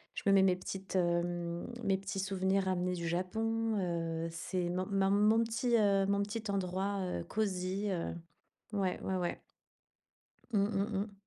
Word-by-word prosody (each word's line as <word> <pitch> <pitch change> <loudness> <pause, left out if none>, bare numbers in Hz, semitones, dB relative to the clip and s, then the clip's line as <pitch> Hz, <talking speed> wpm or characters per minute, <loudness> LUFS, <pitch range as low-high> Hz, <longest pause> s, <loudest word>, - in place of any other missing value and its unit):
je - - -4
me 200 - +5
mets 195 - +7
mes 185 -1 +4
petites, 190 +1 -6
hem, 175 -1 0 0.2
mes 195 -2 +2
petits 195 0 -4
souvenirs 190 0 +1
ramenés 180 -1 0
du 170 -1 -3
Japon, 220 +5 0 0.5
heu, - - -1
c'est 175 +1 -2
mon 180 +1 -1
mon 195 -1 +2
mon 215 +3 +5
petit, 235 +2 +1
heu, 200 -2 +3
mon 200 0 +2
petit 210 +2 -4
endroit, 195 +1 -1
heu, 180 - -2
cosy, 195 0 -1
heu, 170 -2 -2 0.6
ouais, 190 -2 0
ouais, 190 - -1
ouais. 175 -1 -2 1.1
Mmh 200 -2 +3
mmh 200 0 -1
mh. 205 -1 -6
195 Hz, 165 wpm, -33 LUFS, 180-205 Hz, 1.1 s, mets